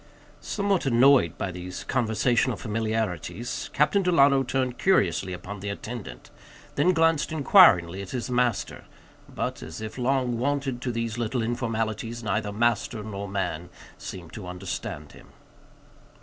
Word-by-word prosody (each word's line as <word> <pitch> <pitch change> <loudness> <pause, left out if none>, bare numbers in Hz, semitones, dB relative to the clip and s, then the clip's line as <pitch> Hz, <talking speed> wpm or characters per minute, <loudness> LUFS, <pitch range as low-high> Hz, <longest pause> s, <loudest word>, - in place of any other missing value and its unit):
Somewhat 200 -6 -1
annoyed 125 - +5
by 100 - -3
these 90 +1 -7
conversational 120 0 +1
familiarities, 110 -2 -3
Captain 150 +7 +3
Delano 140 -7 +4
turned 130 -1 -2
curiously 95 - +2
upon 90 +3 -7
the 100 +1 -5
attendant, 100 - -7 0.4
then 155 +6 +3
glanced 165 -3 +2
inquiringly 115 - +5
at 100 - -8
his 125 -2 -3
master; 125 -3 -1 0.4
but, - - -4
as 80 +1 -8
if 110 +3 -7
long 125 -2 0
wonted 135 -1 -1
to 125 - -2
these 115 0 -3
little 120 +1 -1
informalities, 115 -1 -2
neither 105 0 -1
master 120 +2 0
nor 100 -1 -5
man 90 -4 -3 0.3
seemed 85 -4 -8
to 105 -4 -8
understand 90 +1 -6
him. - - -16
115 Hz, 135 wpm, -26 LUFS, 100-130 Hz, 0.4 s, annoyed